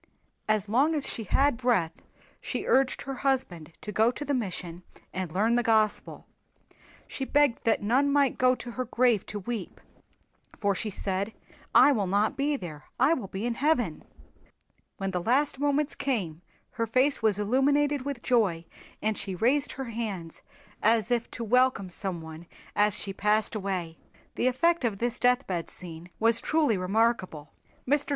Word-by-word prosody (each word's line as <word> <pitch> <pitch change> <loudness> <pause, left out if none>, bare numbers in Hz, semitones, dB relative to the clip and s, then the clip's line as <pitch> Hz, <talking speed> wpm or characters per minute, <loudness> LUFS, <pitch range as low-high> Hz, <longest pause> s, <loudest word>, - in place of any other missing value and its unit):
As 215 -1 +1
long 275 +9 +2
as 290 - -1
she 225 - -4
had 275 +5 +2
breath 230 -10 +1 0.5
she - - -4
urged 265 0 +2
her 270 - -5
husband 195 - -1
to 210 - -6
go 220 +3 +3
to 290 +4 -5
the 285 - -1
mission 180 -7 -4 0.3
and 185 -3 -4
learn 215 +7 +2
the 240 - +3
Gospel. 220 -3 +1 0.8
She 270 - -5
begged 285 -2 +2
that 225 -2 +2
none 265 +7 +2
might 280 -2 +2
go 255 0 +4
to 245 - -8
her 255 +2 -3
grave 240 -3 +2
to 210 - -5
weep, 210 -1 -5 0.8
for 200 -1 +1
she 215 +3 -3
said, 195 +2 -2 0.4
"I 290 - +8
will 210 -8 0
not 205 +8 +1
be 285 +2 0
there. 155 - -8
I 270 +6 +5
will 250 -11 -3
be 195 +3 -5
in 240 - 0
Heaven." 245 - 0 0.9
When 195 -2 -3
the 180 -1 -2
last 265 +7 +1
moments 290 +1 +1
came 185 - -2 0.3
her 230 -1 -2
face 260 +5 +2
was 215 -3 +3
illuminated 280 +6 +2
with 275 -2 -5
joy 200 -10 +1 0.4
and 215 0 +1
she 195 -2 -5
raised 255 +9 +1
her 260 -3 -6
hands 195 -8 -5 0.4
as 225 +1 +2
if 235 -1 0
to 235 - -6
welcome 250 -4 +2
someone 170 -3 -6 0.3
as 210 0 +2
she 195 - -4
passed 210 +2 +1
away. 185 -6 -3 0.3
The 250 - 0
effect 335 +6 +2
of 220 -4 0
this 240 +3 -2
deathbed 245 -9 +1
scene 170 -1 -9
was 230 +1 +4
truly 300 -8 +2
remarkable. 185 -5 0 0.3
Mr. 290 +1 +2
225 Hz, 165 wpm, -28 LUFS, 195-260 Hz, 0.9 s, I